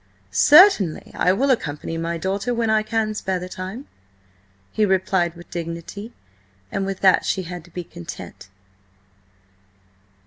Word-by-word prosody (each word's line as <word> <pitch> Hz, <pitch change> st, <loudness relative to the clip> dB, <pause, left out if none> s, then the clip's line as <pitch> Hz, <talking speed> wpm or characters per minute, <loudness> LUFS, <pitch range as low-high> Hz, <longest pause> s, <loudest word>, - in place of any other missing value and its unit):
"Certainly 290 Hz, -, +5 dB
I 180 Hz, -, +2 dB
will 265 Hz, +8 st, +2 dB
accompany 160 Hz, -, -2 dB
my 165 Hz, +1 st, -2 dB
daughter 195 Hz, +7 st, -2 dB
when 230 Hz, -1 st, +1 dB
I 215 Hz, 0 st, +3 dB
can 215 Hz, 0 st, -1 dB
spare 190 Hz, -3 st, -2 dB
the 180 Hz, 0 st, -6 dB
time," 190 Hz, +8 st, -7 dB, 0.9 s
he 215 Hz, -, 0 dB
replied 185 Hz, -3 st, +1 dB
with 170 Hz, 0 st, -14 dB
dignity, 170 Hz, +6 st, -6 dB, 0.6 s
and 195 Hz, 0 st, -2 dB
with 195 Hz, -1 st, -4 dB
that 190 Hz, -1 st, +5 dB
she 190 Hz, -, -1 dB
had 175 Hz, -1 st, -7 dB
to -, -, -17 dB
be 175 Hz, +1 st, -6 dB
content. 85 Hz, -, -10 dB
190 Hz, 140 wpm, -22 LUFS, 170-215 Hz, 0.9 s, Certainly